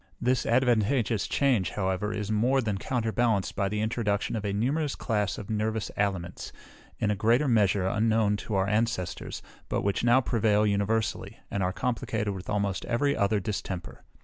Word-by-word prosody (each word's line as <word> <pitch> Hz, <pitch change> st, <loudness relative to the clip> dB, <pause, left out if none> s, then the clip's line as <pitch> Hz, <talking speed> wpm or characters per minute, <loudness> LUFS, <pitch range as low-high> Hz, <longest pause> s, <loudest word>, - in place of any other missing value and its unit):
This 125 Hz, 0 st, +1 dB
advantageous 120 Hz, -2 st, +2 dB
change, 120 Hz, -, +2 dB
however, 95 Hz, +1 st, -1 dB
is 105 Hz, -1 st, -3 dB
more 120 Hz, +6 st, +2 dB
than 105 Hz, -6 st, -1 dB
counterbalanced 115 Hz, -3 st, 0 dB
by 100 Hz, 0 st, 0 dB
the 105 Hz, +1 st, -2 dB
introduction 110 Hz, -2 st, -1 dB
of 110 Hz, -, -3 dB
a 100 Hz, -, -1 dB
numerous 135 Hz, +8 st, 0 dB
class 105 Hz, -4 st, -1 dB
of 105 Hz, +2 st, -7 dB
nervous 110 Hz, 0 st, -1 dB
aliments, 95 Hz, -4 st, -2 dB, 0.5 s
in 105 Hz, -, 0 dB
a -, -, +1 dB
greater 115 Hz, +8 st, +2 dB
measure, 100 Hz, -5 st, +3 dB
unknown 110 Hz, 0 st, +2 dB
to 105 Hz, 0 st, -4 dB
our 95 Hz, 0 st, +2 dB
ancestors, 105 Hz, -3 st, -2 dB, 0.3 s
but -, -, -1 dB
which 100 Hz, +2 st, 0 dB
now 120 Hz, +2 st, +5 dB
prevail 110 Hz, -4 st, +2 dB
universally, 105 Hz, +2 st, -1 dB
and 100 Hz, -, -1 dB
are 90 Hz, 0 st, +1 dB
complicated 110 Hz, -2 st, -2 dB
with 95 Hz, -1 st, -8 dB
almost 100 Hz, -2 st, -1 dB
every 140 Hz, +4 st, +1 dB
other 100 Hz, 0 st, +2 dB
distemper. 95 Hz, -3 st, -5 dB
105 Hz, 165 wpm, -28 LUFS, 100-115 Hz, 0.5 s, now